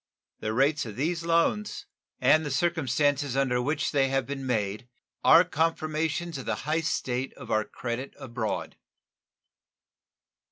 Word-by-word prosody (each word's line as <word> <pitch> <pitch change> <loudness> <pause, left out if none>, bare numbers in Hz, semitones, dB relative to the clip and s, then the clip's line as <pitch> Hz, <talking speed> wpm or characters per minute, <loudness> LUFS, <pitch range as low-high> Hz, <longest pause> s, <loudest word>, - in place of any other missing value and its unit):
The 110 - -2
rates 135 +3 +2
of 105 - -7
these 165 +6 -1
loans 170 +5 +1 0.3
and 155 0 +5
the 150 - -3
circumstances 145 -2 +1
under 125 -3 +2
which 150 +4 -1
they 135 -2 +3
have 135 -1 0
been 135 0 -5
made 110 0 -1 0.3
are 165 +2 +8
confirmations 160 -1 -1
of 130 - -8
the - - 0
high 155 +2 +1
state 130 -4 -2
of 125 -4 -9
our 110 0 +2
credit 125 +2 -5
abroad. 115 -3 -4
140 Hz, 135 wpm, -27 LUFS, 125-160 Hz, 0.3 s, are